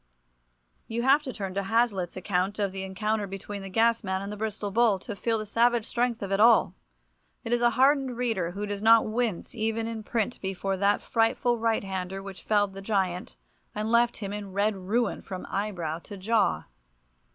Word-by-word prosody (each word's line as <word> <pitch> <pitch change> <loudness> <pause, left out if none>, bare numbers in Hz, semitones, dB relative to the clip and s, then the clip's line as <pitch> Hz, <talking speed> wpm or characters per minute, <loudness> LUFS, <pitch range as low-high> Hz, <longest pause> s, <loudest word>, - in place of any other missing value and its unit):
You 235 +1 -2
have 275 +3 +5
to 275 -3 -5
turn 195 -5 -5
to 200 - -1
Hazlitt's 200 -4 0
account 185 +1 -1
of 200 -2 0
the 190 0 -5
encounter 205 +2 -2
between 195 +1 -6
the 195 - -7
Gasman 215 -2 +1
and 200 - -5
the - - -5
Bristol 210 -1 -3
Bull, 225 -1 +3
to 205 +3 -7
feel 225 +2 0
the 215 - -4
savage 235 +1 +2
strength 235 -2 -1
of 195 - -4
it 195 - +1
all. 225 0 +5 0.7
It 230 - -2
is 240 - +2
a 240 - +5
hardened 270 -2 +3
reader 225 -9 0
who 200 +4 -4
does 205 -1 -4
not 225 +1 +6
wince 220 -1 -2
even 225 0 -1
in 225 -1 -4
print 230 +1 -2
before 195 0 -2
that 200 +1 +2
frightful 230 +1 +1
right 225 -1 +1
hander 190 0 -4
which 195 -1 -9
felled 205 -2 +1
the 195 - -8
giant, 190 - -1 0.4
and 215 +1 -2
left 235 0 +3
him 200 -2 -5
in 205 -2 -6
"red 205 +2 +1
ruin" 205 +4 -1
from 185 -2 -7
eyebrow 175 -6 -2
to 205 - -8
jaw. 215 +3 +1
210 Hz, 195 wpm, -27 LUFS, 195-230 Hz, 0.7 s, not